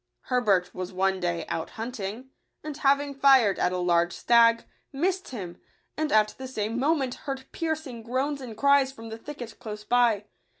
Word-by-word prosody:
Herbert 205 -8 +2
was 185 0 -5
one 190 +1 +1
day 170 -2 -2
out 160 - -3
hunting; 230 +2 -5 0.3
and 305 -1 -5
having 280 0 +2
fired 265 -7 +5
at 180 - +2
a 180 - -2
large 175 -1 +2
stag, 230 -1 +4 0.3
missed 370 +7 -1
him, 185 -8 -7 0.3
and 310 0 -1
at 215 -1 +4
the 260 - -5
same 225 -1 -3
moment 275 -2 +1 0.2
heard 265 -1 -4
piercing 315 -7 -3
groans 265 +5 -2
and 230 -4 -8
cries 280 0 +4
from 225 -3 -10
the 225 - -6
thicket 245 -4 -9
close 210 -1 -7
by. 230 -3 +2
240 Hz, 170 wpm, -27 LUFS, 205-275 Hz, 0.3 s, fired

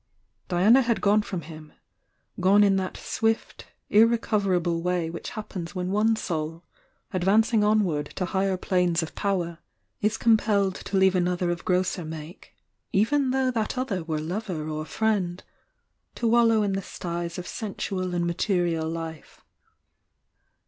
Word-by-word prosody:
Diana 200 +9 +5
had 235 -2 0
gone 210 +1 +3
from 185 -4 -5
him,— 155 0 -11 0.7
gone 195 +3 +5
in 200 -1 +4
that 185 -1 -3
swift, 225 0 -2 0.2
ir 220 +2 +7
recoverable 195 -7 0
way 175 -2 -1
which 170 - -6
happens 200 -4 -7
when 180 0 -2
one 215 +3 +3
soul, 165 -4 -4 0.5
ad 185 - -1
vancing 215 +3 +3
onward 195 -9 +2
to 185 - -1
higher 190 0 0
planes 180 -3 +1
of 160 - -7
power, 175 -5 -2 0.4
is 215 +2 +1
com 230 -1 +5
pelleo 200 -3 +1
to 195 - -3
leave 190 0 +5
another 180 -1 +1
of 175 - -4
grosser 180 0 0
make 155 +1 -9 0.4
(even 265 +7 +2
though 260 0 +1
that 225 +1 -2
other 220 -9 -2
were 160 -2 -2
lover 175 -1 -4
or 155 0 -4
friend) 190 -4 -1 0.7
to 235 - -1
wallow 230 -2 +4
in 200 -1 0
the 195 - -1
styes 170 -2 -5
of 180 - -5
sensual 190 -4 -3
and 175 0 0
material 170 -2 0
life. 165 -1 -7
185 Hz, 150 wpm, -26 LUFS, 170-215 Hz, 0.7 s, ir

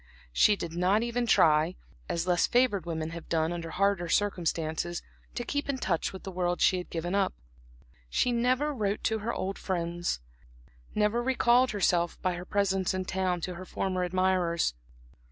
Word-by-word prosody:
She 210 - +5
did 170 -4 -6
not 185 +6 +2
even 240 0 -1
try, 160 -2 +4 0.3
as 170 0 -1
less 175 -2 +3
favored 240 -8 +2
women 160 -1 -3
have 170 -1 -8
done 160 0 +1
under 170 -1 -5
harder 195 -1 +1
circumstances, 170 -3 -1 0.3
to 240 - -2
keep 285 +3 -3
in 275 - 0
touch 175 -9 -1
with 190 - -9
the 195 - -6
world 175 -1 -1
she 185 - +4
had 180 - -8
given 175 +2 -3
up. 200 - +1 0.7
She 245 - +1
never 255 +5 +1
wrote 210 -5 -1
to 220 0 +1
her 220 +3 -2
old 195 -2 -3
friends, 175 - -2 0.8
never 210 +3 +2
recalled 250 0 +3
herself, 175 -4 +1
by 185 - +1
her 175 +1 -6
presence 195 -2 +1
in 185 0 -2
town, 185 -2 -1
to 180 - -3
her 180 +2 -8
former 185 -1 -2
admirers. 180 - +1
185 Hz, 170 wpm, -29 LUFS, 170-210 Hz, 0.8 s, She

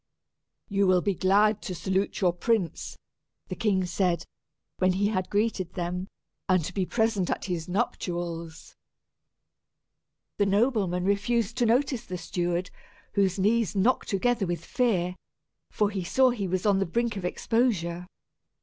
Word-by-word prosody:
"You 200 -1 +1
will 185 -1 +4
be 200 - +1
glad 205 +4 +3
to 185 - -5
salute 190 +4 -1
your 180 -2 +3
prince," 200 -1 -1 0.5
the - - -3
king 195 -4 +1
said, 180 -1 0 0.5
when 185 0 +3
he 200 +2 +1
had 185 -4 -2
greeted 205 -4 -1
them, 180 +1 -3 0.4
"and 185 -4 +3
to 180 - -5
be 185 -2 -1
present 220 -5 +1
at - - -2
his 175 -3 -3
nuptials." 170 -5 -3 1.6
The 205 - +2
noblemen 200 -4 +1
refused 210 +3 +1
to 240 -2 +2
notice 255 +1 +1
the 180 -4 -5
steward, 175 +1 -2 0.4
whose 195 -2 +2
knees 215 +2 +2
knocked 220 +7 +2
together 220 +1 +1
with 175 0 -3
fear, 190 -8 0 0.5
for 210 -2 0
he 195 -3 -3
saw 255 +8 +3
he 205 -5 -3
was 185 +2 -2
on 200 -2 +4
the 195 - 0
brink 235 +4 -1
of 195 - -5
exposure. 180 -4 0
195 Hz, 150 wpm, -27 LUFS, 180-220 Hz, 1.6 s, will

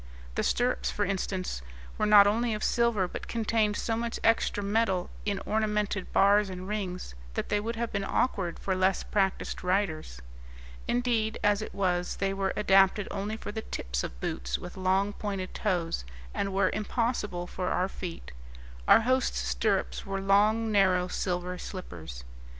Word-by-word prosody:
The - - 0
stirrups, 250 +1 +1
for 205 - 0
instance, 185 - -2 0.4
were - - +2
not 205 -1 +9
only 225 +2 +1
of 210 - -5
silver, 235 -6 +2
but - - -7
contained 220 -2 +1
so 225 - -1
much 230 +1 -3
extra 225 -2 +2
metal 200 -3 +1 0.2
in 200 -1 +1
ornamented 210 -2 0
bars 200 +1 +4
and 185 0 -6
rings 190 - -4 0.2
that - - -2
they 210 - +2
would 230 +3 -3
have 235 0 -2
been 200 -1 -1
awkward 195 -5 0
for 190 - -1
less 185 +1 +2
practised 195 -3 -1
riders. 180 - -1 0.7
Indeed, 235 -3 +1
as 205 0 +3
it 215 - -6
was, 180 -2 0
they 195 0 -1
were 195 0 0
adapted 195 0 +4
only 205 +2 -3
for 205 - -6
the 220 +1 -4
tips 60 - -3
of - - -6
boots - - -2
with - - -9
long, 190 +2 +1
pointed 195 -3 -4
toes, 175 - -1 0.3
and 195 - -1
were 190 -1 +2
impossible 210 -4 -1
for 180 0 -4
our 185 - +1
feet; 180 - -7 0.6
our - - +8
hosts' 255 +2 +1
stirrups 60 +1 0
were 195 0 -3
long, 210 +3 +3
narrow 185 -3 +3
silver 180 0 -2
slippers. 80 - -7
195 Hz, 160 wpm, -29 LUFS, 180-215 Hz, 0.7 s, not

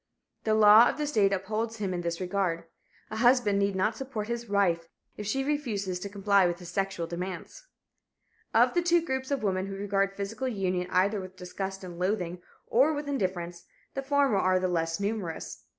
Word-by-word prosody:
The 215 -1 +3
law 215 +2 +8
of - - -3
the 300 - -1
state 210 -9 +2
upholds 215 +4 -2
him 195 -3 -2
in 175 - -2
this 170 -1 -3
regard. 180 -2 -1 0.5
A 220 - -4
husband 240 -4 +4
need 200 -1 +1
not 190 +4 +1
support 230 -4 -5
his 235 -1 -4
wife 175 -5 +2 0.3
if 210 - -6
she 270 +5 0
refuses 220 -11 -2
to 200 - -5
comply 200 -1 +3
with 175 0 -2
his 175 -2 -10
sexual 195 -2 -2
demands. 180 - -6 0.8
Of - - +4
the 350 - +2
two 345 -1 +3
groups 265 -3 -2
of 280 -4 -1
women 190 -1 0
who 195 - -5
regard 195 0 0
physical 220 +6 -3
union 185 -6 -1
either 195 +3 +2
with 185 0 -10
disgust 190 +2 -5
and 175 -2 -8
loathing, 180 -2 -1 0.2
or 280 +6 +3
with 290 0 -4
indifference, 180 -9 -3 0.3
the 270 - -2
former 275 -5 +2
are 185 -1 +3
the 185 - 0
less 165 -1 -1
numerous. 200 -5 -4
200 Hz, 190 wpm, -28 LUFS, 185-230 Hz, 0.8 s, law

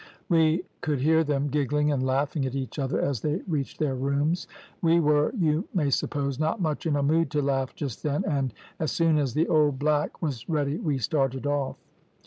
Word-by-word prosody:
We 165 +1 +3 0.2
could 150 -4 -1
hear 160 +3 +4
them 145 -1 0
giggling 150 +1 +1
and 135 -3 0
laughing 140 +3 0
at 130 - -5
each 135 +2 -4
other 135 0 0
as 135 -6 -1
they 155 +4 -1
reached 150 -6 -2
their 150 -3 0
rooms. 140 +6 0 0.3
We 170 0 +4
were, 150 -1 +3
you 160 0 +1
may 150 -6 +2
suppose, 140 0 -1
not 155 +7 0
much 160 -2 -1
in 150 - +1
a 140 - +1
mood 160 +2 +2
to 150 0 0
laugh 135 -1 -1
just 135 -7 -5
then, 145 -1 -1
and, 135 -4 0 0.3
as 155 - -1
soon 165 -2 +3
as 135 -5 -1
the 160 +3 +2
old 150 -3 +3
black 150 +1 0
was 135 -6 -4
ready 150 -1 0
we 150 -4 0
started 135 +1 0
off. 145 -2 -1
145 Hz, 200 wpm, -26 LUFS, 140-155 Hz, 0.3 s, hear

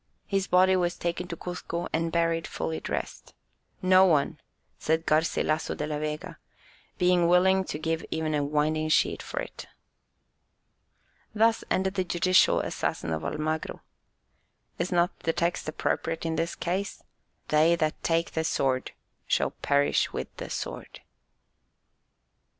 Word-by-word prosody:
His 195 -1 -1
body 185 +1 +5
was 175 -1 +1
taken 175 +1 -3
to 170 - -6
Cuzco 175 -1 -4
and 165 +1 0
buried 165 -1 +1
fully 80 0 -3
dressed; - - -5 0.5
"No 185 0 +6
one," 155 -7 +2 0.4
says 160 +1 +1
Garcilasso 155 0 +1
de 150 - -2
la 150 -1 -3
Vega, 150 0 -5 0.6
"being 180 -2 +3
willing 190 +2 +4
to 150 - -4
give 160 +1 -2
even 160 -1 -1
a 145 -1 +1
winding 155 +2 0
sheet - - +2
for - - -5
it." - - -7 1.7
Thus 225 +1 +3
ended 190 0 +1
the 190 -2 0
judicial 185 +1 +3
assassin 80 - -2
of 80 0 -3
Almagro. 155 - -3 1.0
Is 180 - -1
not 175 0 +1
the 165 - -1
text 170 -2 -1
appropriate 165 +1 -2
in 165 0 -1
this 165 +1 -1
case: 190 +3 -3 0.5
"They 155 +3 +4
that 155 -2 -1
take 165 0 0
the 160 - -1
sword 130 -5 0 0.3
shall - - +1
perish 140 0 +1
with - - -6
the - - -6
sword"? - - -6
165 Hz, 140 wpm, -27 LUFS, 155-180 Hz, 1.7 s, No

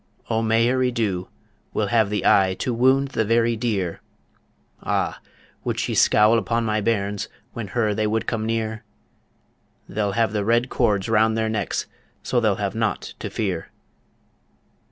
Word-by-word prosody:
O 110 0 +1
Mairi 120 +3 +2
Dhu 100 -7 -1 0.5
will 105 - +1
have 110 -3 +3
the 105 0 -2
eye 95 -1 +4
To 125 - -2
wound 130 +3 +3
the 115 - 0
very 115 +1 +2
deer 105 -7 -2 0.8
Ah! - - -1 0.4
would - - -2
she - - -1
scowl 110 +2 +5
upon 115 +3 -1
my 110 -1 0
bairns 100 -2 -1 0.2
When 115 -4 -5
her 110 0 0
they 110 +1 0
would 110 +1 -1
come 110 -2 -2
near? 110 0 -2 1.0
They'll 100 0 -1
have 115 0 +1
the 105 -1 0
red 120 +4 +2
cords 100 -2 +1
round 110 0 +3
their 110 0 0
necks, 110 -2 -2 0.4
So 125 - +1
they'll 110 -4 +2
have 100 0 -2
naught 110 -1 -2
to - - -4
fear. 95 -7 -3
110 Hz, 155 wpm, -23 LUFS, 105-115 Hz, 1.0 s, scowl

